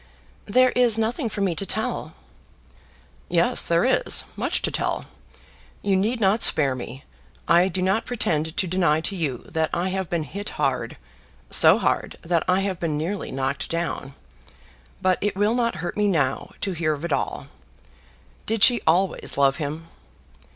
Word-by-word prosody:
"There 255 Hz, +4 st, +4 dB
is 240 Hz, -3 st, +4 dB
nothing 230 Hz, +3 st, -1 dB
for 205 Hz, -, -5 dB
me 190 Hz, -3 st, +1 dB
to 165 Hz, -, -1 dB
tell." 195 Hz, -, -3 dB, 1.1 s
"Yes -, -, +3 dB
there -, -, +2 dB
is; -, -, +2 dB
much -, -, -1 dB
to -, -, 0 dB
tell. -, -, -2 dB, 0.8 s
You 200 Hz, -1 st, +2 dB
need 220 Hz, +6 st, 0 dB
not 210 Hz, +2 st, +2 dB
spare 140 Hz, -4 st, +5 dB
me. 130 Hz, +2 st, -8 dB, 0.4 s
I 175 Hz, +2 st, +5 dB
do 185 Hz, 0 st, -2 dB
not 195 Hz, +4 st, 0 dB
pretend 160 Hz, -9 st, -1 dB
to -, -, +2 dB
deny 175 Hz, -4 st, +1 dB
to 180 Hz, +5 st, -3 dB
you 145 Hz, -9 st, -3 dB
that 160 Hz, -1 st, -1 dB
I 180 Hz, +2 st, -1 dB
have 190 Hz, -2 st, -3 dB
been 170 Hz, -2 st, -1 dB
hit 200 Hz, +6 st, -6 dB
hard, -, -, -1 dB, 0.5 s
so -, -, +6 dB
hard, -, -, -1 dB
that 170 Hz, -1 st, +1 dB
I 185 Hz, +1 st, +2 dB
have 190 Hz, -2 st, -3 dB
been 160 Hz, -3 st, -2 dB
nearly 180 Hz, +7 st, -3 dB
knocked 135 Hz, +1 st, -3 dB
down; 165 Hz, -5 st, -3 dB, 0.9 s
but 185 Hz, -1 st, +2 dB
it 205 Hz, -1 st, -1 dB
will 205 Hz, +3 st, +1 dB
not 235 Hz, -1 st, 0 dB
hurt 175 Hz, -, -4 dB
me 210 Hz, 0 st, +1 dB
now 150 Hz, -9 st, 0 dB
to 195 Hz, -, -1 dB
hear 160 Hz, -3 st, -1 dB
of 145 Hz, +3 st, -7 dB
it -, -, -1 dB
all. -, -, -3 dB, 1.0 s
Did 220 Hz, -2 st, +1 dB
she 240 Hz, -3 st, +6 dB
always 180 Hz, 0 st, +1 dB
love 140 Hz, -1 st, +3 dB
him?" 155 Hz, +1 st, -5 dB
185 Hz, 170 wpm, -23 LUFS, 160-205 Hz, 1.1 s, so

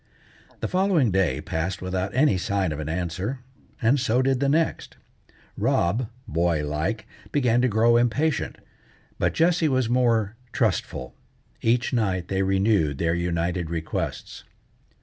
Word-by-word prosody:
The -, -, -1 dB
following 180 Hz, -, +2 dB
day 85 Hz, -7 st, +1 dB
passed 85 Hz, +5 st, -3 dB
without 95 Hz, +1 st, -2 dB
any 135 Hz, -5 st, +4 dB
sign 95 Hz, -1 st, -1 dB
of 75 Hz, -, -4 dB
an 75 Hz, 0 st, -4 dB
answer, 90 Hz, +9 st, -3 dB, 0.4 s
and 130 Hz, +4 st, +3 dB
so 125 Hz, 0 st, +2 dB
did 135 Hz, -1 st, +1 dB
the 140 Hz, 0 st, +1 dB
next. 160 Hz, +3 st, 0 dB, 0.6 s
Rob, 110 Hz, +7 st, +1 dB, 0.2 s
boy 80 Hz, -1 st, 0 dB
like, 80 Hz, +10 st, -2 dB, 0.3 s
began 125 Hz, -4 st, +2 dB
to 130 Hz, -, +3 dB
grow 115 Hz, +1 st, +4 dB
impatient, 125 Hz, +5 st, 0 dB, 0.6 s
but -, -, +1 dB
Jessie 165 Hz, -1 st, +3 dB
was 130 Hz, -4 st, +1 dB
more 115 Hz, -4 st, +2 dB, 0.2 s
trustful. -, -, -1 dB, 0.5 s
Each 120 Hz, +2 st, +1 dB
night 95 Hz, -7 st, 0 dB
they 95 Hz, 0 st, 0 dB
renewed 95 Hz, -6 st, +2 dB
their 85 Hz, +2 st, +1 dB
united 85 Hz, 0 st, -1 dB
requests. 80 Hz, -1 st, -4 dB
105 Hz, 135 wpm, -25 LUFS, 85-125 Hz, 0.6 s, any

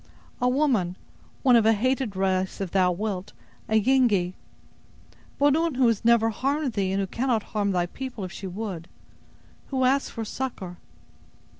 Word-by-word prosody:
"A 250 Hz, -, +3 dB
woman. 250 Hz, -10 st, +1 dB, 0.5 s
One 255 Hz, -3 st, +6 dB
of 230 Hz, -, +5 dB
a 225 Hz, -, +6 dB
hated 255 Hz, -1 st, 0 dB
race, 190 Hz, 0 st, 0 dB
if 195 Hz, -3 st, -3 dB
thou 185 Hz, -2 st, +3 dB
wilt—a 205 Hz, +3 st, -5 dB
Yengee. 215 Hz, -7 st, +2 dB, 1.0 s
But 285 Hz, 0 st, +4 dB
one 325 Hz, -2 st, 0 dB
who 260 Hz, 0 st, +3 dB
has 230 Hz, -2 st, +2 dB
never 230 Hz, -1 st, +4 dB
harmed 275 Hz, +3 st, -1 dB
thee, 195 Hz, -3 st, 0 dB
and 195 Hz, -, 0 dB
who 195 Hz, -, 0 dB
cannot 235 Hz, +2 st, -1 dB
harm 205 Hz, -2 st, +1 dB
thy 180 Hz, -2 st, +1 dB
people, 245 Hz, +3 st, -7 dB
if 185 Hz, -, -5 dB
she 195 Hz, -, -7 dB
would; 185 Hz, -3 st, -5 dB, 0.8 s
who 265 Hz, -2 st, -1 dB
asks 270 Hz, +2 st, +2 dB
for 225 Hz, -2 st, -5 dB
succor." 205 Hz, -8 st, -5 dB
220 Hz, 160 wpm, -25 LUFS, 190-260 Hz, 1.0 s, One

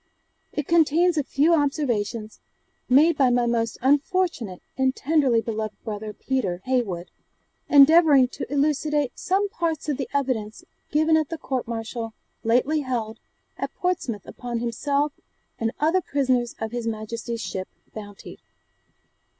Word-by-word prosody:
It 295 Hz, -, -3 dB
contains 335 Hz, +1 st, +4 dB
a 300 Hz, -, +1 dB
few 295 Hz, +5 st, +2 dB
observations 240 Hz, -8 st, -1 dB, 0.5 s
made 300 Hz, +6 st, +5 dB
by 265 Hz, -3 st, +4 dB
my 245 Hz, 0 st, +2 dB
most 230 Hz, -1 st, 0 dB
unfortunate 285 Hz, -, +1 dB
and 265 Hz, 0 st, +1 dB
tenderly 275 Hz, -7 st, +2 dB
beloved 220 Hz, -2 st, -4 dB
brother, 215 Hz, -1 st, -5 dB
Peter 210 Hz, -6 st, -2 dB
Heywood, 215 Hz, -9 st, -1 dB, 0.6 s
endeavouring 290 Hz, -2 st, +7 dB
to 255 Hz, -, -7 dB
elucidate 295 Hz, -1 st, +1 dB
some 390 Hz, +2 st, +1 dB
parts 330 Hz, -5 st, -2 dB
of 285 Hz, -, 0 dB
the 270 Hz, -, -4 dB
evidence 250 Hz, -7 st, -2 dB, 0.3 s
given 315 Hz, +2 st, +3 dB
at 310 Hz, -2 st, 0 dB
the 330 Hz, -, -4 dB
court 260 Hz, -6 st, -3 dB
martial 225 Hz, 0 st, -5 dB, 0.3 s
lately 255 Hz, +7 st, +2 dB
held 235 Hz, -5 st, -3 dB, 0.4 s
at -, -, -4 dB
Portsmouth 260 Hz, -, -2 dB
upon 240 Hz, -1 st, -5 dB
himself 280 Hz, +5 st, -1 dB, 0.5 s
and 225 Hz, 0 st, 0 dB
other 325 Hz, +5 st, +2 dB
prisoners 255 Hz, -6 st, 0 dB
of 220 Hz, 0 st, -3 dB
his 240 Hz, -1 st, -3 dB
Majesty's 230 Hz, +1 st, -4 dB
ship 190 Hz, -3 st, -4 dB, 0.3 s
Bounty. 205 Hz, -2 st, -10 dB
260 Hz, 135 wpm, -24 LUFS, 225-300 Hz, 0.6 s, endeavouring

